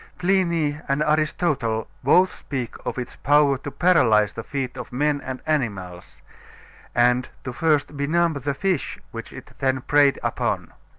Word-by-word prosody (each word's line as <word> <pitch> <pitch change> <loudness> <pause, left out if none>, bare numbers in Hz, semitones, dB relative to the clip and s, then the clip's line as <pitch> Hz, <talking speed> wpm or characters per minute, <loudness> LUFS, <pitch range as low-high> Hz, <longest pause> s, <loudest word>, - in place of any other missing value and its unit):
Pliny 170 -5 +1
and 140 +2 +1
Aristotle 150 -7 0 0.2
both 180 +8 +4
speak 130 -5 -5
of - - -3
its 125 -1 -6
power 145 -2 +3
to 145 - -6
paralyze 125 - +3
the - - -5
feet 135 -1 -4
of 125 -3 -8
men 145 +3 0
and 130 -1 -6
animals, 100 - -3 0.7
and 125 +1 +3
to 125 - -5
first 150 +1 +1
benumb 165 +4 +1
the 140 0 -3
fish 190 +2 -1
which - - -8
it - - -11
then 130 -1 +1
preyed 145 +1 +3
upon. - - -2
140 Hz, 150 wpm, -23 LUFS, 125-155 Hz, 0.7 s, both